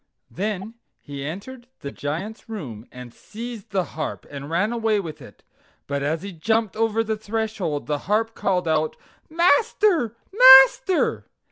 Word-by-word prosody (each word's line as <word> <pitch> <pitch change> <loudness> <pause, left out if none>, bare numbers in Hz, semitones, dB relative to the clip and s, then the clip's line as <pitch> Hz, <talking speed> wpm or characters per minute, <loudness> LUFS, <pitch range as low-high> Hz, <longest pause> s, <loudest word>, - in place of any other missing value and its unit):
Then 205 +2 -4 0.3
he 140 -1 -8
entered 225 - -8
the 140 - -6
Giant's 175 +12 -6
room 130 - -7
and 125 -2 -11
seized 230 0 -9
the 195 -3 0
harp 155 - -5
and 140 0 -7
ran 200 +8 0
away 225 -3 +1
with 160 -5 -7
it; - - -15 0.4
but 140 0 -3
as 155 +5 -2
he 200 - -6
jumped 220 +5 0
over 225 0 +1
the 220 0 -2
threshold 215 -7 -3
the 145 -1 -2
harp 225 +2 +1
called 180 -5 -1
out: 155 -1 0 0.3
"MASTER! 340 - +2 0.2
MASTER!" 380 - +6
210 Hz, 145 wpm, -23 LUFS, 155-225 Hz, 0.4 s, MASTER